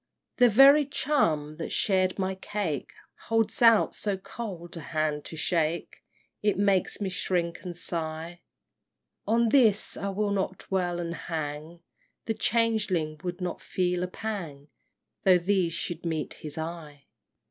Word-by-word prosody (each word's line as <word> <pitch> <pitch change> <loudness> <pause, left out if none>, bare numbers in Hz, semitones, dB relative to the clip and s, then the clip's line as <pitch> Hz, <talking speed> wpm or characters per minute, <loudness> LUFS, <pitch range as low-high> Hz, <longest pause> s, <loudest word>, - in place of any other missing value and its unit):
VIII. 245 - +8
The - - +1
very 280 +3 +8
chum 155 - 0
that 165 - -4
shared 185 -2 +1
my 190 -1 -1
cake 190 -6 -4 0.4
Holds 225 0 +1
out 230 -2 +6
so 205 -2 -1
cold 185 -4 -7
a - - -5
hand 155 -1 -2
to 160 - -8
shake, 165 0 -1 0.4
It 210 -1 +1
makes 200 -2 +2
me 205 - -2
shrink 175 -2 -1
and 175 -2 -7
sigh: 165 0 -3 0.9
On 230 +1 +3
this 220 -5 +4
I 200 - -3
will 205 +1 -1
not 190 -2 -1
dwell 180 -2 -1
and 170 -1 -3
hang, 160 0 -5 0.4
The 225 - 0
changeling 210 -10 0
would 180 +1 -4
not 180 -1 -3
feel 180 -1 -1
a 180 - -1
pang 175 -9 -6 0.5
Though 185 -2 +6
these 180 -1 +1
should 170 0 -3
meet 160 -3 -3
his 150 -1 -9
eye! 160 -3 -7
180 Hz, 145 wpm, -27 LUFS, 165-205 Hz, 0.9 s, VIII